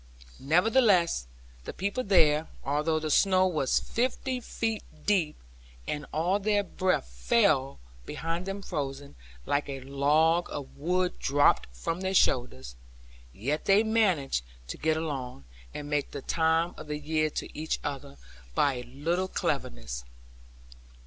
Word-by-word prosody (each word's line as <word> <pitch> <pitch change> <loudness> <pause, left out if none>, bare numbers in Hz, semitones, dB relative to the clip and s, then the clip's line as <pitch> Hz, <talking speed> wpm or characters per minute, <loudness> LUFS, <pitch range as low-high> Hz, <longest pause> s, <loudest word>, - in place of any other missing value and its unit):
Nevertheless 180 - +3 0.4
the - - -5
people 200 +7 -2
there 160 -6 +4 0.2
(although 150 +3 +1
the 155 -1 -2
snow 185 +3 +4
was 155 -8 +1
fifty 255 +1 -1
feet 225 -2 -2 0.2
deep, 180 -7 +2 0.5
and 150 -1 -3
all 175 +6 +1
their 205 0 +2
breath 185 - 0
fell 115 - +2 0.3
behind 165 +3 -3
them 195 +1 -4
frozen, 140 -5 -4 0.3
like 145 0 0
a 135 -1 -5
log 150 +5 +2
of 140 -2 -7
wood 180 +4 0
dropped 145 +1 +3
from 60 - -4
their 190 0 -1
shoulders), 65 - +1 0.6
yet 140 - -3
they 200 +2 +5
managed 190 - +1 0.3
to - - -5
get 160 0 +1
along, 130 - -4 0.3
and 145 - -6
make 145 -1 -1
the 140 - -7
time 165 +1 +1
of - - -9
the 150 0 -3
year 155 +1 0
to - - -6
each 155 +1 -2
other, 135 - -5 0.4
by 140 -3 +2
a 125 - -5
little 165 +9 -1
cleverness. - - -3
155 Hz, 135 wpm, -28 LUFS, 140-185 Hz, 0.6 s, they